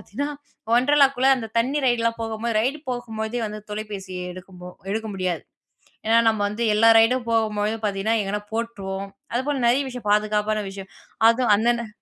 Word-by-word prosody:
பாத்தீங்கன்னா 285 +8 -4 0.4
Wonderlaக்குள்ள 270 +1 +4
அந்த 225 -3 -5
தண்ணீ 265 +6 +1
ரைடுலாம் 230 -1 +1
போகம்பொழுது, 225 0 -1
ரைடு 270 +6 0
போகும்பொழுதே 235 -1 -4
வந்து 210 0 -6
தொலைபேசிய 205 -3 -6 0.2
எடுக்கும்போ 180 0 -11 0.2
எடுக்க 220 +1 -2
முடியாது, 185 -2 -2 0.6
ஏன்னா 225 +1 +4
நம்ப 220 -2 -1
வந்து 220 +3 -3
எல்லா 225 +2 +6
ரைடும் 235 +1 +2
போகம்பொழுது 215 -1 0
பாத்தீங்கன்னா 200 +3 0
எங்கனா 205 +1 -3
போட்ருவோம். 200 -4 -4 0.3
அதுபோல 270 +2 -1
நெறைய 265 +4 +3
விஷயம் 245 -5 -5
பாதுகாப்பான 210 0 +1
விஷயம், 195 0 -10 0.4
அதும் 235 -1 +2
அன்னன 235 +1 +1
225 Hz, 145 wpm, -23 LUFS, 210-240 Hz, 0.6 s, எல்லா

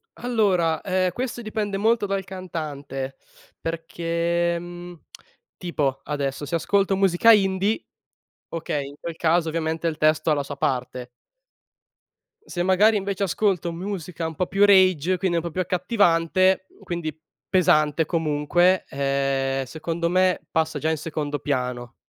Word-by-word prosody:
Allora, 195 -10 +1
ehm, 185 -1 0
questo 245 +4 -4
dipende 210 -2 -2
molto 225 +1 +2
dal 195 0 -1
cantante 150 -8 -6 0.4
perché, 170 +1 -1
mhmm, 175 0 -9 0.6
tipo, 140 -7 -2
adesso, 140 -1 -3
se 150 - -2
ascolto 195 +3 +1
musica 195 +3 +5
indie, 195 - +1 0.6
okay, 155 -4 -3
in 140 - -10
quel 170 -1 -6
caso 165 0 +2
ovviamente 160 +1 -1
il 155 -2 -4
testo 155 +1 +2
ha - - +4
la 145 -1 -2
sua 140 +1 -7
parte. 125 -2 -2 1.4
Se 175 - -3
magari 195 +4 +4
invece 200 0 -2
ascolto 185 -3 0
musica 175 -2 -5
un 160 0 -4
po' 180 - -1
più 200 +2 +4
rage, 185 -3 +4
quindi 180 -2 0
un 165 - -1
po' 170 - -4
più 185 - -1
accattivante, 185 0 +2 0.2
quindi, 170 -4 -4 0.3
pesante 155 -4 +3
comunque, 165 +3 +2
ehm, 135 -1 0
secondo 165 +4 -3
me, 185 0 +2
passa 160 -2 0
già 155 - 0
in 160 - 0
secondo 150 -1 -3
piano. 125 -3 -3
170 Hz, 140 wpm, -24 LUFS, 150-185 Hz, 1.4 s, musica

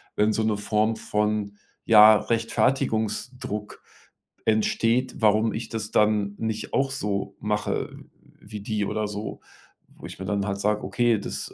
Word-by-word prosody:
wenn 105 +1 +2
so 110 - 0
'ne 110 -1 +1
Form 105 +2 +1
von, 105 -1 -1 0.3
ja, 110 -1 +8
Rechtfertigungsdruck 115 0 -1 0.6
entsteht, 115 +3 +1
warum 110 0 +3
ich 115 - -5
das 110 -2 -5
dann 105 -1 +2
nicht 110 -1 -4
auch 135 0 +1
so 100 -3 -3
mache 105 0 -2 0.5
wie 105 0 -9
die 105 -1 -2
oder 105 +1 -2
so, 105 +1 -6 0.6
wo - - -11
ich - - -9
mir 95 - -5
dann 100 0 -1
halt 100 0 -2
sage: 105 +1 +1
„Okay, 120 -3 +1
das - - -5
105 Hz, 145 wpm, -25 LUFS, 105-110 Hz, 0.6 s, ja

